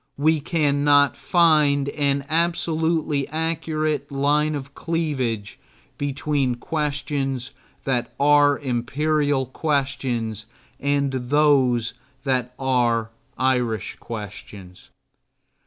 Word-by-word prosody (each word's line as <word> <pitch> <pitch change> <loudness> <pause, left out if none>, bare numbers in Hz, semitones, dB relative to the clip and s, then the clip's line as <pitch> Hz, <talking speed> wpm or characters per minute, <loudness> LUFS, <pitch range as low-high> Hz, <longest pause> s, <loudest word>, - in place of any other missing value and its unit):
We 155 +2 +3
cannot 145 -2 +3
find 150 -5 +3
an 140 -1 0
absolutely 160 -2 0
accurate 155 -2 -2
line 150 +2 +1
of 140 -1 -7
cleavage 135 -12 -2 0.4
between 140 -2 0
questions 140 -2 -2 0.3
that 125 -3 -1
are 145 0 +5
imperial 140 +2 0
questions 130 -6 -2 0.3
and 140 -1 +1
those 130 -3 +2 0.3
that 125 -2 -1
are 120 -4 +1 0.3
Irish 125 -5 0
questions. 105 -4 -9
140 Hz, 80 wpm, -23 LUFS, 125-150 Hz, 0.4 s, are